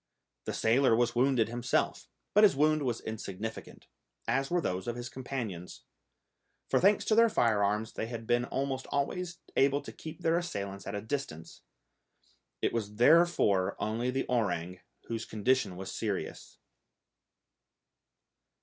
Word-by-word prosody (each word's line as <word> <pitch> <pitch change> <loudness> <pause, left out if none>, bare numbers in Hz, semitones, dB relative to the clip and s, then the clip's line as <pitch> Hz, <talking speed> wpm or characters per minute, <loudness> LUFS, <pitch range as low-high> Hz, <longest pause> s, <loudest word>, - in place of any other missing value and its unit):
The - - -3
sailor 115 +1 +3
was 120 0 +2
wounded 125 -2 +3
himself, 120 +1 -1 0.3
but 210 - +6
his 205 - +6
wound 155 +2 +3
was 120 -4 -1
insignificant, 110 0 -6 0.4
as 135 0 +1
were 175 - +2
those 90 - -2
of 120 - -2
his 120 +1 -6
companions; 115 -9 -6 0.9
for - - +4
thanks 200 +2 +4
to - - +2
their 230 +1 +6
firearms 105 - +1
they 115 - -3
had 115 -1 -6
been 120 +1 +2
almost 135 0 -3
always 175 +5 -2 0.2
able 140 +1 +3
to - - -9
keep 160 0 -9
their 165 +1 +3
assailants 100 - -5
at 100 - -4
a 100 - -3
distance. 105 - -5 1.0
It - - +1
was 105 -3 -3
therefore 120 - +4
only 115 +3 -1
the 135 +1 -1
orang 90 -7 -1 0.2
whose 115 -1 -4
condition 110 -2 0
was 95 +1 -6
serious. 105 -4 -4
120 Hz, 140 wpm, -30 LUFS, 105-140 Hz, 1.0 s, but